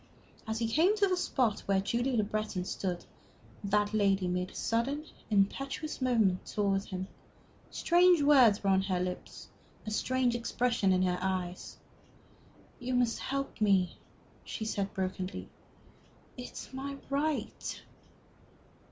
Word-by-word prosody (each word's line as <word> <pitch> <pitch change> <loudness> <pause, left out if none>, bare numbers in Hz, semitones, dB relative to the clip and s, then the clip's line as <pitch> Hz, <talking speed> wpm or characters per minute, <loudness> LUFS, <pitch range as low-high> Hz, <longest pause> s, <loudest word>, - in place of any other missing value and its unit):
As 220 0 -2
he 230 0 0
came 335 - +3
to 405 - +4
the 370 - +2
spot 250 - +1
where 195 -1 +3
Julie 240 +6 0
Le 215 - +3
Breton 215 -3 -2
stood, 180 -2 -3 0.6
that 205 +1 +1
lady 195 -3 +2
made 180 +1 -1
a - - -16
sudden, 275 +7 -1 0.2
impetuous 275 +9 0
movement 220 -8 +2
towards 200 -1 0
him. 185 0 -4 0.6
Strange 350 -2 +4
words 255 -9 +6
were 195 - +3
on 190 0 +4
her 190 -2 -1
lips, 180 0 -5 0.4
a 215 - -4
strange 255 +2 +1
expression 240 -3 +1
in 185 0 +3
her 180 -1 +1
eyes. 185 -1 -3 1.0
"You 250 +1 -2
must 245 -2 +2
help 275 -3 -3
me," 195 -4 +3 0.5
she 220 - -5
said, 200 -2 -2
brokenly. 185 0 -3 0.9
"It 250 -1 -8
is - - -8
my 275 +1 -5
right!" 295 +2 -2
215 Hz, 135 wpm, -31 LUFS, 190-260 Hz, 1.0 s, words